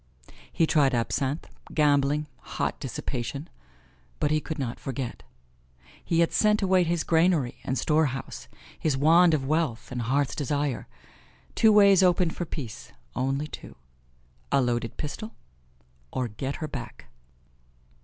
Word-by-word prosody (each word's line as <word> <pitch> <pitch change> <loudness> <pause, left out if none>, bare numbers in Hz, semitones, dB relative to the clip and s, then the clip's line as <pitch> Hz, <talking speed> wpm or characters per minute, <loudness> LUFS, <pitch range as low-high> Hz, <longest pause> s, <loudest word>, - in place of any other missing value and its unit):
He 165 - +2
tried 145 -5 +3
absinthe, 135 +5 -1 0.3
gambling, 145 0 +3 0.3
hot - - -1
dissipation; 135 +6 -4 0.7
but 150 -1 +1
he 155 0 +2
could 160 - -5
not 125 -5 -4
forget. 130 -2 -5 0.8
He 170 0 +2
had 170 - +2
sent 210 -1 +3
away 185 -1 +4
his 170 -1 0
granary 165 -6 +2
and 130 - -2
storehouse; 150 -3 0 0.3
his 150 -4 0
wand 165 +3 +5
of 135 -3 -2
wealth 150 -6 -1
and 125 -1 -3
heart's 135 +4 0
desire. 145 -3 -2 0.7
Two 220 - +5
ways 200 -2 +6
opened 180 -2 +3
for 175 - -3
peace, 130 -9 -7 0.2
only 135 +3 0
two: 150 - -10 0.8
a - - +4
loaded 120 -3 -1
pistol 215 +9 -6 0.8
or 130 -1 -1
get 130 +7 -4
her 155 - -4
back. 120 -6 -8
145 Hz, 135 wpm, -27 LUFS, 130-165 Hz, 0.8 s, ways